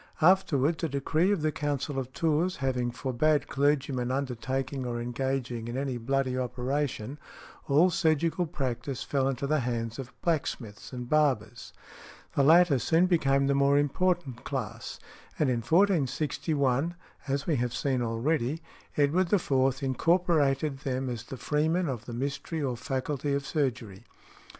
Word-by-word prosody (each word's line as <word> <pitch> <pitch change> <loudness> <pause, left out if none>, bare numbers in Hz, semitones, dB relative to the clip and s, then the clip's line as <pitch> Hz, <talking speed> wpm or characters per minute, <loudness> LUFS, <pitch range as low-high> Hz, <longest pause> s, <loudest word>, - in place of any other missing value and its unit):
Afterwards, 170 -3 +3
a 165 - +1
decree 155 +7 +1
of 190 -7 0
the 155 - +2
Council 145 -1 -2
of 130 -1 -5
Tours 165 +5 +1
having 125 -3 -1
forbad 135 +4 +1
clergymen 140 -3 +1
undertaking 130 +1 -2
or 120 -1 -3
engaging 125 -1 -2
in 120 +2 -4
any 135 -3 -2
bloody 130 +2 0
operation, 130 +1 -2 0.5
all 155 +6 +4
surgical 165 0 +1
practice 135 -3 -3
fell 135 -2 0
into 135 +1 -2
the 155 +2 +2
hands 115 -2 -3
of 130 -1 -6
blacksmiths 130 -10 -2
and 125 -2 -6
barbers. 125 -6 0 0.6
The - - +2
latter 160 -1 +6
soon 165 +7 +3
became 140 -6 +2
the 140 - +2
more 140 +1 +4
important 145 -3 0
class, 120 -4 -5 0.4
and 145 -4 +2
in 120 - +1
1461 150 - +1 0.3
(as 140 0 -1
we 155 -4 +1
have 120 0 -1
seen 130 -1 0
already), 120 +5 0 0.4
Edward 160 +5 +2
IV. 135 -9 +2
incorporated 150 -1 +2
them 130 -1 -2
as 115 -3 -6
"The 135 - -7
Freeman 160 +6 0
of 120 -5 -4
the 120 - -7
Mystery 140 +6 -3
or 130 -3 -1
Faculty 140 +2 -2
of 140 0 -2
Surgery." 125 - -2
140 Hz, 145 wpm, -28 LUFS, 125-155 Hz, 0.6 s, latter